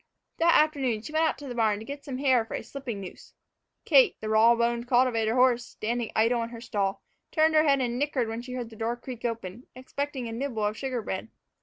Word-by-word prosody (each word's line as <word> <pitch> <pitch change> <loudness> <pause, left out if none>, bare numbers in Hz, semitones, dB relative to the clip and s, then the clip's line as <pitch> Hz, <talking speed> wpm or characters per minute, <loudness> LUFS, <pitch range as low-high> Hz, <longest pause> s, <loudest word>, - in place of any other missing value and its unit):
That 335 +1 +5
afternoon 270 -8 +2
she 305 - -8
went 320 +1 +3
out 315 - 0
to 290 - -9
the 250 - -5
barn 220 -3 +1
to 220 - -9
get 280 +2 -7
some 265 -3 -5
hair 260 -3 +3
for 225 - -6
a - - -5
slipping 245 -7 -6
noose. 185 - -11 0.5
Kate, - - +5
the 215 - -5
raw 220 +2 +5
boned 235 +1 0
cultivator 240 -3 +2
horse, 250 -1 +4
standing 230 +1 -3
idle 230 +2 +3
in 230 - -3
her 230 -1 -9
stall, 200 -4 -2 0.3
turned 315 0 +3
her 310 0 +5
head 275 -2 +3
and 245 -1 -1
nickered 280 -5 0
when 225 +1 -4
she 250 +1 -8
heard 245 -2 -5
the - - -11
door 225 +2 -2
creak 245 -1 -9
open, 230 -1 -5
expecting 260 0 -4
a - - -5
nibble 230 -3 -2
of 210 +1 -1
sugar 255 -2 -3
bread. 190 +1 -4
240 Hz, 230 wpm, -27 LUFS, 225-270 Hz, 0.5 s, That